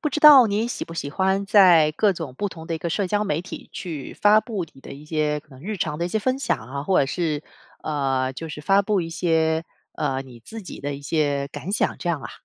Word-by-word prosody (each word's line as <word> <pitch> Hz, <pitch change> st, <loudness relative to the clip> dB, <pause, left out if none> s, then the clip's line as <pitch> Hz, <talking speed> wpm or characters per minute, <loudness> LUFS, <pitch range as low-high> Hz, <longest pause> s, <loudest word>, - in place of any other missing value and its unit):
不 300 Hz, -, 0 dB
知 305 Hz, +2 st, -3 dB
道 285 Hz, -5 st, +9 dB
你 215 Hz, +3 st, 0 dB
喜 -, -, -4 dB
不 165 Hz, -, -10 dB
喜 145 Hz, -3 st, -4 dB
欢 190 Hz, +4 st, +1 dB
在 180 Hz, -7 st, +6 dB
各 210 Hz, -2 st, +3 dB
种 165 Hz, -7 st, -6 dB
不 205 Hz, -, -1 dB
同 165 Hz, -3 st, -10 dB
的 165 Hz, 0 st, -3 dB
一 -, -, -9 dB
个 170 Hz, -, -3 dB
社 190 Hz, +3 st, -1 dB
交 210 Hz, +2 st, +1 dB
媒 160 Hz, -4 st, -1 dB
体 180 Hz, -, -9 dB
去 155 Hz, -7 st, -6 dB
发 210 Hz, +1 st, +5 dB
布 215 Hz, -5 st, -4 dB
你 135 Hz, -, -17 dB
的 -, -, -10 dB
一 140 Hz, +2 st, -11 dB
些 150 Hz, -1 st, -1 dB
可 155 Hz, -, -33 dB
能 130 Hz, -, -13 dB
日 215 Hz, +2 st, -3 dB
常 150 Hz, -4 st, -2 dB
的 170 Hz, -, -1 dB
一 -, -, -2 dB
些 200 Hz, -, -2 dB
分 255 Hz, +4 st, 0 dB
享 275 Hz, -, 0 dB
啊， 135 Hz, +5 st, -7 dB
或 190 Hz, -, +3 dB
者 135 Hz, -, +2 dB
是， 155 Hz, 0 st, -2 dB, 0.4 s
呃， 135 Hz, -3 st, -1 dB
就 165 Hz, +5 st, -7 dB
是 150 Hz, -, -7 dB
发 195 Hz, +6 st, +3 dB
布 200 Hz, -1 st, +1 dB
一 165 Hz, -1 st, -5 dB
些， 160 Hz, -1 st, +1 dB, 0.3 s
呃， 135 Hz, 0 st, -1 dB
你 130 Hz, -3 st, -13 dB
自 220 Hz, -, -10 dB
己 185 Hz, -, -9 dB
的 145 Hz, 0 st, -3 dB
一 140 Hz, -, -9 dB
些 145 Hz, -2 st, 0 dB
感 185 Hz, +6 st, -6 dB
想， -, -, 0 dB
这 175 Hz, -, -4 dB
样 165 Hz, -4 st, 0 dB
啊？ -, -, -7 dB
165 Hz, 285 characters per minute, -23 LUFS, 145-200 Hz, 0.4 s, 道